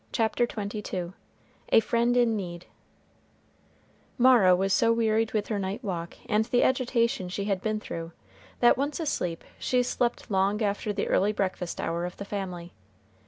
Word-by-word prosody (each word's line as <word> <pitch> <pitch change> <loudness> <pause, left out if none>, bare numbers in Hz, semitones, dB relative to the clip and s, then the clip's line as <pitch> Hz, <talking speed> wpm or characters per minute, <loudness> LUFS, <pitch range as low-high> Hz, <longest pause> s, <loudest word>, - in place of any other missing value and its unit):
CHAPTER 230 +1 +1
XXII 200 -5 -5 0.6
A - - +7
FRIEND 235 +2 +1
IN 235 -2 +3
NEED 175 -4 -5 1.5
Mara 240 -8 +6
was 190 +1 +1
so 230 - +4
wearied 225 -1 +1
with 210 -2 -1
her 210 -3 -1
night 195 +6 -4
walk 170 -5 -4
and 215 0 +2
the 245 +1 +2
agitation 235 -7 +1
she 200 +2 -3
had 195 -3 -1
been 215 0 -1
through, 165 -5 -6 0.5
that 240 - +6
once 285 +4 -2
asleep 180 - -2 0.2
she 250 -1 +1
slept 245 -1 -2
long 200 +3 +1
after 205 +1 -1
the 200 -1 -2
early 205 +2 +2
breakfast 185 -3 -3
hour 170 +1 -2
of 180 - -7
the 200 - -6
family. 180 -4 -5
210 Hz, 160 wpm, -27 LUFS, 185-235 Hz, 1.5 s, A